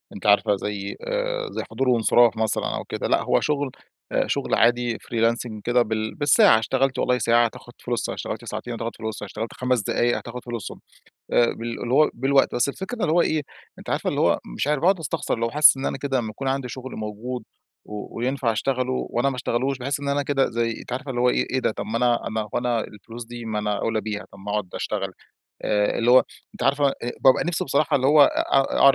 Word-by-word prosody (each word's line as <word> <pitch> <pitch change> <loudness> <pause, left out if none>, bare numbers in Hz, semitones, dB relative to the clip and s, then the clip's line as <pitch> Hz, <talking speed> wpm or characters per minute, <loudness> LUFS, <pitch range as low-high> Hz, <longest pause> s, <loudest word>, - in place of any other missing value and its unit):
أنتِ 100 - -10
عارفة 105 0 +4
زي 100 0 -4
آآ - - -2
زي - - -4
حضور 130 +3 0
وإنصراف 120 -1 +4
مثلًا 110 -1 -1
أو - - -4
كده. - - -3
لأ - - +2
هو - - +2
شغل 145 -3 -1 0.4
أ - - +1
شغل - - 0
عادي 120 0 +2
freelancing 115 -1 -1
كده 120 0 +3
بال 110 -1 -2
بالساعة. 150 - +5
اشتغلت 130 +4 0
والله 125 0 +2
ساعة 120 0 +3
هتاخد 115 - -7
فلوسها، - - -2
اشتغلت - - -5
ساعتين 120 - -5
هتاخد 115 0 -4
فلوسها، 110 -2 -5
اشتغلت 110 +3 -6
5 125 -2 0
دقايق 120 +4 +1
هتاخد 120 +1 -8
فلوسهم. 120 -5 -6 0.5
آآ 120 - +4
بال 115 0 -5
اللي 120 +2 -1
هو 155 +2 +5
بالوقت. 135 +3 +2
بس 120 +3 +2
الفكرة 190 - -5
إن 225 - -5
اللي 160 - +2
هو 175 - +4
إيه، 155 -3 +1 0.4
أنتِ - - -8
عارفة - - 0
اللي - - -1
هو - - +3 0.2
مش - - -1
عارف 150 -1 +1
باقعد 185 +3 +3
أستخسر. 155 -4 -2
اللي 115 0 -1
هو - - -3
حاسس 150 0 +6
إن 135 - -3
أنا - - -2
كده 135 -1 -1
لمّا 110 -2 -4
يكون 135 +5 -4
عندي 135 -1 -1
شغل 130 +1 -7
موجود 110 +3 -5 0.4
و 105 +1 -8
وينفع 125 -1 0
أشتغله 130 +3 -1 0.2
وأنا 120 +4 +1
ما 130 - -5
أشتغلوش، 130 +2 -1
باحس 140 +2 -2
إن 140 - -4
أنا 145 +1 +1
كده 140 -1 +1
زي 115 0 0
أنتِ - - -9
عارفة 135 +2 -4
اللي 120 -2 -2
هو 125 - +4
إيه، - - +1
إيه 130 - 0
ده؟! - - +1
طب - - -5
ما 110 +2 -2
أنا 120 0 +1
أنا 110 -1 -3
وأنا 120 -2 0
الفلوس 115 +4 -9
دي 120 0 -8
ما 110 -2 -2
أنا 105 -1 -1
أوْلى 110 -1 -1
بيها، 105 0 -5
طب - - -14
ما 100 +2 -7
أقعد 105 -3 -1
أشتغل. 95 -3 -3 0.5
آآ 105 -1 +1
اللي 120 +1 +3
هو، 130 +1 +7 0.3
أنتِ - - -7
عارفة 140 +1 +3 0.3
بابقى 130 - +5
نفسي 175 -1 -1
بصراحة 145 +2 +2
اللي 130 - +1
هو 150 +1 +7
أ - - +8
أ 135 0 +1
أقعد 140 -1 +7
120 Hz, 230 wpm, -24 LUFS, 110-135 Hz, 0.5 s, أ